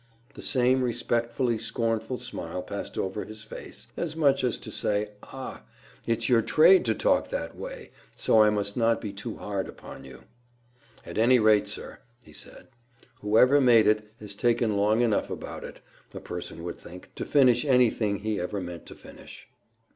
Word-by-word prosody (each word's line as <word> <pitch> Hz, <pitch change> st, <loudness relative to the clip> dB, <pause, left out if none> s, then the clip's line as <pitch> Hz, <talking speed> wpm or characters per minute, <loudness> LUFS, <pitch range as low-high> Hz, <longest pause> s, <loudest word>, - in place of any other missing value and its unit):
The -, -, -10 dB
same 130 Hz, 0 st, +2 dB
respectfully 120 Hz, 0 st, -1 dB
scornful 115 Hz, +2 st, -2 dB
smile 90 Hz, -8 st, -5 dB
passed 100 Hz, -, -6 dB
over 95 Hz, +2 st, -2 dB
his 110 Hz, 0 st, -10 dB
face, 110 Hz, -, -10 dB
as 160 Hz, -2 st, -3 dB
much 140 Hz, -4 st, +2 dB
as 125 Hz, -, +1 dB
to 110 Hz, -, -9 dB
say, 105 Hz, 0 st, -1 dB
"Ah! 135 Hz, -1 st, -8 dB, 0.5 s
it's 115 Hz, -1 st, +1 dB
your 120 Hz, -2 st, +4 dB
trade 160 Hz, -, +5 dB
to 110 Hz, -2 st, +1 dB
talk -, -, +1 dB
that 80 Hz, 0 st, -4 dB
way, -, -, -8 dB, 0.2 s
so 110 Hz, -, +4 dB
I 105 Hz, -, +6 dB
must 100 Hz, -1 st, -1 dB
not 115 Hz, -1 st, +2 dB
be 105 Hz, -2 st, -6 dB
too 110 Hz, +3 st, -6 dB
hard 100 Hz, -2 st, -3 dB
upon -, -, -11 dB
you." 65 Hz, -1 st, -13 dB, 0.8 s
"At -, -, -5 dB
any 125 Hz, +3 st, +5 dB
rate, 110 Hz, -2 st, +4 dB
sir," -, -, -6 dB, 0.2 s
he -, -, -17 dB
said, -, -, -6 dB, 0.5 s
"whoever 125 Hz, +7 st, +4 dB
made 120 Hz, -4 st, +6 dB
it 105 Hz, 0 st, +1 dB
has 105 Hz, -2 st, -6 dB
taken 115 Hz, 0 st, +1 dB
long 105 Hz, +3 st, +2 dB
enough 115 Hz, -4 st, +1 dB
about -, -, -7 dB
it, -, -, -10 dB, 0.3 s
a -, -, -5 dB
person 85 Hz, -, -7 dB
would 85 Hz, -1 st, -6 dB
think, 90 Hz, +1 st, -13 dB
to -, -, -5 dB
finish 130 Hz, -4 st, +4 dB
anything 120 Hz, -6 st, +2 dB
he 110 Hz, -1 st, -2 dB
ever 100 Hz, +3 st, -3 dB
meant 90 Hz, -3 st, -8 dB
to -, -, -10 dB
finish." -, -, -13 dB
110 Hz, 175 wpm, -27 LUFS, 105-125 Hz, 0.8 s, I